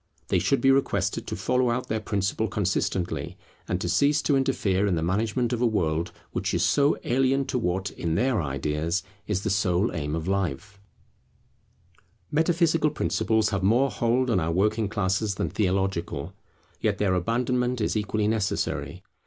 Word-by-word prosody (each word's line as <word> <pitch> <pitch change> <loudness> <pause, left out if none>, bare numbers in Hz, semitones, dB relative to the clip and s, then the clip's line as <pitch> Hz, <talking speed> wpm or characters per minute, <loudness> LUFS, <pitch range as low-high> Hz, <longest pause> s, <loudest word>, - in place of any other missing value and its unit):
They 90 - +3
should 100 +11 +1
be 135 - +5
requested 135 0 0
to - - -3
follow 125 -1 +1
out 120 +2 -1
their 110 - -1
principle 105 +1 -1
consistently, 95 -2 -2 0.3
and 90 - -1
to - - -2
cease 140 - +3
to 145 - +2
interfere 105 -8 +1
in 95 - +1
the 80 - -1
management 110 +7 0
of 120 - -2
a 125 - +4
world 85 -6 0 0.2
which - - -2
is - - +1
so 145 0 +3
alien 135 +2 +2
to 125 - -1
what, 95 -2 -1
in 80 -1 -2
their 125 -1 +1
ideas, 75 +5 -1 0.2
is 100 -2 -1
the 110 - 0
sole 95 +1 +1
aim 75 -2 -2
of 80 +1 -4
life. 100 0 -2 1.5
[From 150 - -1
metaphysical 165 -1 +3
doctrines] - - -2
Metaphysical - - -3 0.2
principles - - +2
have 100 -2 -1
more 120 +8 +3
hold 120 +2 +1
on 100 - +3
our 80 0 -1
working 105 +4 +1
classes 100 0 0
than 85 - -2
theological; 95 -6 -1 0.5
yet - - 0
their 100 -3 +1
abandonment 125 +6 0
is 105 - 0
equally 105 0 0
necessary. 90 -7 -2
105 Hz, 175 wpm, -26 LUFS, 90-125 Hz, 1.5 s, be